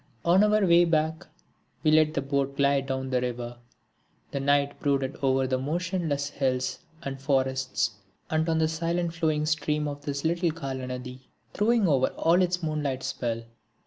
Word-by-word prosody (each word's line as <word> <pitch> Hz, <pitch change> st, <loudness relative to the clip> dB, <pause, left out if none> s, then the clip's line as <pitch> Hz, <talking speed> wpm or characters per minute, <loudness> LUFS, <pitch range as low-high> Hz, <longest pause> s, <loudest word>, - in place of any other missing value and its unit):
On 180 Hz, +4 st, +5 dB
our 210 Hz, -1 st, +3 dB
way 170 Hz, -1 st, +6 dB
back 160 Hz, 0 st, 0 dB, 0.6 s
we 155 Hz, -, +4 dB
let 155 Hz, 0 st, +4 dB
the 140 Hz, -, 0 dB
boat 140 Hz, 0 st, -1 dB
glide 140 Hz, -1 st, +2 dB
down 130 Hz, 0 st, -3 dB
the 125 Hz, -1 st, +2 dB
river. 120 Hz, -1 st, -4 dB, 0.7 s
The 140 Hz, -, -2 dB
night 140 Hz, +1 st, +1 dB
brooded 140 Hz, -1 st, 0 dB
over 135 Hz, -1 st, +2 dB
the 130 Hz, 0 st, 0 dB
motionless 160 Hz, -1 st, -1 dB
hills 130 Hz, -2 st, -1 dB, 0.2 s
and 135 Hz, -1 st, -5 dB
forests, 130 Hz, -3 st, 0 dB, 0.4 s
and 160 Hz, +1 st, 0 dB
on 160 Hz, -, +2 dB
the 160 Hz, 0 st, +3 dB
silent 170 Hz, +1 st, -1 dB
flowing 155 Hz, -2 st, 0 dB
stream 150 Hz, -1 st, 0 dB
of 145 Hz, 0 st, -6 dB
this 140 Hz, 0 st, -3 dB
little 170 Hz, +1 st, +1 dB
Kalanadi, 130 Hz, -4 st, -6 dB, 0.3 s
throwing 220 Hz, -1 st, +3 dB
over 135 Hz, -4 st, +3 dB
all 170 Hz, +3 st, +4 dB
its 180 Hz, -1 st, 0 dB
moonlight 150 Hz, -4 st, -2 dB
spell. 120 Hz, -4 st, -3 dB
145 Hz, 160 wpm, -27 LUFS, 130-165 Hz, 0.7 s, way